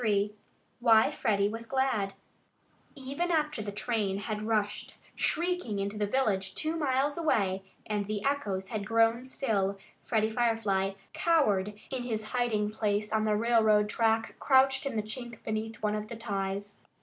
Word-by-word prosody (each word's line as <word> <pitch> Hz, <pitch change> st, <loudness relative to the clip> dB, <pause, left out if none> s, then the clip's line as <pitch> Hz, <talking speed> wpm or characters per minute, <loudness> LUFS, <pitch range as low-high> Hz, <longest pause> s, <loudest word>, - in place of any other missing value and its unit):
XXIII 205 Hz, -2 st, +1 dB, 0.5 s
WHY 225 Hz, -2 st, +5 dB
FREDDIE 200 Hz, -2 st, +1 dB
WAS 230 Hz, +1 st, -6 dB
GLAD 230 Hz, -8 st, 0 dB, 0.8 s
Even 280 Hz, +6 st, -3 dB
after 305 Hz, -7 st, +1 dB
the 205 Hz, -1 st, -4 dB
train 210 Hz, -2 st, -1 dB
had 210 Hz, +1 st, -3 dB
rushed 210 Hz, -2 st, -1 dB, 0.2 s
shrieking 350 Hz, -, 0 dB
into 200 Hz, +1 st, -2 dB
the 210 Hz, -1 st, 0 dB
village 200 Hz, -6 st, 0 dB
two 315 Hz, +1 st, 0 dB
miles 285 Hz, 0 st, +1 dB
away, 195 Hz, -, +1 dB, 0.2 s
and 210 Hz, -2 st, -2 dB
the 210 Hz, 0 st, -3 dB
echoes 205 Hz, -10 st, -1 dB
had 215 Hz, -3 st, -3 dB
grown 225 Hz, +2 st, +3 dB
still, 205 Hz, -7 st, 0 dB, 0.2 s
Freddie 220 Hz, -1 st, +1 dB
Firefly 220 Hz, -5 st, +1 dB, 0.2 s
cowered 210 Hz, -, +2 dB, 0.2 s
in 260 Hz, -2 st, -2 dB
his 220 Hz, -3 st, -4 dB
hiding 220 Hz, -4 st, +1 dB
place 210 Hz, 0 st, -1 dB
on 215 Hz, 0 st, +2 dB
the 215 Hz, -1 st, +2 dB
railroad 215 Hz, -2 st, +4 dB
track, 225 Hz, 0 st, +1 dB
crouched 265 Hz, +1 st, +4 dB
in 275 Hz, -, -4 dB
the 215 Hz, -, 0 dB
chink 240 Hz, +2 st, -8 dB
beneath 220 Hz, 0 st, -4 dB
one 210 Hz, 0 st, +1 dB
of 210 Hz, 0 st, -3 dB
the 235 Hz, -, -7 dB
ties. 200 Hz, -2 st, -3 dB
220 Hz, 155 wpm, -30 LUFS, 205-250 Hz, 0.8 s, WHY